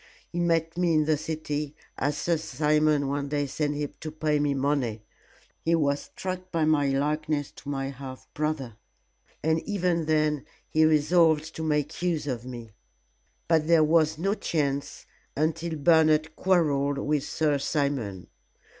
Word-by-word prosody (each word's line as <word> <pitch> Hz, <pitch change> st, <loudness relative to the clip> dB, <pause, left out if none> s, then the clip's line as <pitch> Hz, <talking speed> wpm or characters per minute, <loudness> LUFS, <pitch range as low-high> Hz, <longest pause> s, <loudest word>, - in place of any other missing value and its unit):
He 175 Hz, -, -3 dB
met 165 Hz, -1 st, +1 dB
me 175 Hz, -2 st, +3 dB
in 155 Hz, -1 st, +3 dB
the 155 Hz, 0 st, +3 dB
city, 150 Hz, -1 st, -4 dB, 0.2 s
as 145 Hz, +2 st, -1 dB
Sir 170 Hz, -, +1 dB
Simon 150 Hz, 0 st, +1 dB
one 140 Hz, 0 st, -2 dB
day 145 Hz, 0 st, 0 dB
sent 145 Hz, +2 st, -2 dB
him 145 Hz, -1 st, -3 dB
to 155 Hz, -, -5 dB
pay 155 Hz, -1 st, 0 dB
me 145 Hz, -1 st, +1 dB
money. 135 Hz, -6 st, -1 dB, 0.6 s
He 165 Hz, +1 st, +3 dB
was 145 Hz, -3 st, +1 dB
struck 185 Hz, 0 st, -6 dB
by 165 Hz, -2 st, +1 dB
my 150 Hz, -2 st, +3 dB
likeness 150 Hz, +2 st, -1 dB
to 140 Hz, -, -9 dB
my 135 Hz, -1 st, -2 dB
half 130 Hz, -1 st, -9 dB
brother, 145 Hz, -7 st, -2 dB, 0.7 s
and 160 Hz, +1 st, +2 dB
even 175 Hz, -5 st, -1 dB
then 155 Hz, -2 st, +1 dB, 0.2 s
he 155 Hz, 0 st, +3 dB
resolved 155 Hz, 0 st, +3 dB
to -, -, -5 dB
make 150 Hz, -1 st, -1 dB
use 170 Hz, -4 st, 0 dB
of 125 Hz, -4 st, -3 dB
me. 120 Hz, -3 st, -8 dB, 0.8 s
But 160 Hz, -2 st, +2 dB
there 165 Hz, -2 st, +5 dB
was 160 Hz, 0 st, +3 dB
no 195 Hz, +5 st, 0 dB
chance 140 Hz, -8 st, -2 dB, 0.3 s
until 160 Hz, +2 st, -1 dB
Bernard 155 Hz, 0 st, +3 dB
quarrelled 145 Hz, -7 st, +2 dB
with 145 Hz, 0 st, 0 dB
Sir 150 Hz, -1 st, 0 dB
Simon. 135 Hz, -, -1 dB
150 Hz, 155 wpm, -27 LUFS, 140-160 Hz, 0.8 s, there